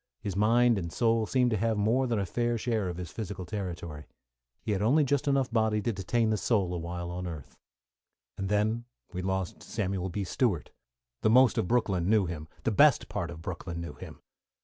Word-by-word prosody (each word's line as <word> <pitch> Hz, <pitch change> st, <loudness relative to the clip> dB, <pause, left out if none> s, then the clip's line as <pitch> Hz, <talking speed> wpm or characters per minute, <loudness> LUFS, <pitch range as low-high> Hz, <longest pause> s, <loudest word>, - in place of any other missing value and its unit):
His 100 Hz, -3 st, -4 dB
mind 115 Hz, +2 st, +4 dB
and 85 Hz, -2 st, -5 dB
soul 115 Hz, 0 st, +2 dB
seemed 125 Hz, 0 st, +2 dB
to 110 Hz, -, +1 dB
have 110 Hz, +1 st, 0 dB
more 115 Hz, +6 st, +2 dB
than 115 Hz, -2 st, 0 dB
a 100 Hz, -, 0 dB
fair 120 Hz, +5 st, 0 dB
share 110 Hz, -4 st, -1 dB
of 85 Hz, -, -5 dB
his 90 Hz, -2 st, -6 dB
physical 100 Hz, -4 st, -5 dB
territory. 85 Hz, -6 st, -5 dB, 0.6 s
He -, -, -2 dB
had 100 Hz, -1 st, 0 dB
only 135 Hz, +9 st, +4 dB
just 145 Hz, 0 st, 0 dB
enough 135 Hz, -3 st, +2 dB
body 110 Hz, -2 st, +2 dB
to 115 Hz, +2 st, -1 dB
detain 110 Hz, +4 st, 0 dB
the 110 Hz, -, +1 dB
soul 100 Hz, -5 st, +1 dB
awhile 85 Hz, 0 st, -4 dB
on 90 Hz, +1 st, -4 dB
earth. 80 Hz, -6 st, -8 dB, 0.8 s
And 95 Hz, 0 st, -3 dB
then 110 Hz, +3 st, +1 dB, 0.3 s
we 90 Hz, -, -3 dB
lost 95 Hz, -1 st, -2 dB
Samuel 95 Hz, -3 st, -2 dB
B. 100 Hz, +3 st, -3 dB
Stewart. 95 Hz, -, 0 dB, 0.5 s
The 110 Hz, -, +3 dB
most 125 Hz, +1 st, +6 dB
of -, -, 0 dB
Brooklyn 95 Hz, -7 st, +1 dB
knew 110 Hz, -3 st, +4 dB
him 80 Hz, -3 st, -5 dB, 0.2 s
the -, -, +1 dB
best -, -, +5 dB
part -, -, -3 dB
of 80 Hz, +2 st, -9 dB
Brooklyn 85 Hz, -1 st, -5 dB
knew 85 Hz, -, -6 dB
him. -, -, -11 dB
105 Hz, 200 wpm, -29 LUFS, 90-115 Hz, 0.8 s, most